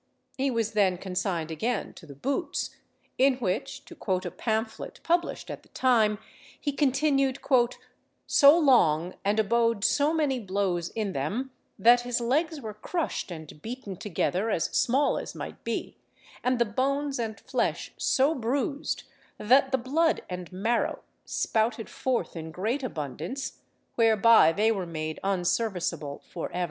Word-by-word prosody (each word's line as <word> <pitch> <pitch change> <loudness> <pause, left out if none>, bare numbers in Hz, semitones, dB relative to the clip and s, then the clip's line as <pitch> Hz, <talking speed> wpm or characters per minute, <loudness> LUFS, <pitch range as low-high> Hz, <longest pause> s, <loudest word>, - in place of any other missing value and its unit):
He 270 +1 0
was 230 -3 0
then 195 -4 +2
consigned 180 -3 -2
again 220 +8 -2
to 165 - -14
the 140 - -10
boots, 270 - -2 0.4
in 265 0 +5
which, 210 -8 -3
to - - -11
quote 185 0 -2
a 175 - -3
pamphlet 220 0 -3
published 345 +1 0
at - - -7
the - - -25
time, 225 -5 +3 0.4
he 290 - -1
continued 275 -1 +2 0.9
"so 285 +2 +7
long, 180 - +4
and 205 +2 +1
abode 230 0 +2
so 285 +7 +3
many 295 -5 +1
blows 190 -4 -1
in 210 -4 -3
them, 260 +8 -2 0.3
that 240 +4 +6
his 245 0 -1
legs 300 +7 0
were 220 -5 -6
crushed 310 - -3
and 155 -3 -9
beaten 230 -4 -6
together 195 +2 -1
as 170 - -1
small 270 +4 +2
as - - -7
might - - -8
be, - - -4 0.5
and 250 0 +2
the 235 - +3
bones 275 +5 -1
and 220 -2 -3
flesh - - -2
so 275 +4 +2
bruised, 275 +3 -2 0.3
that 265 +5 +4
the 265 - +3
blood 305 +7 +1
and 180 0 -6
marrow 220 +6 -1 0.2
spouted 220 0 0
forth 255 -7 -1
in 160 -1 -6
great 215 - -2
abundance, 165 - -5 0.3
whereby 225 -5 +6
they 215 +6 +2
were 190 -5 -2
made 155 -1 -4
unserviceable 180 -5 -1
for 170 - -5
ever." 180 - -2
225 Hz, 150 wpm, -27 LUFS, 185-265 Hz, 0.9 s, so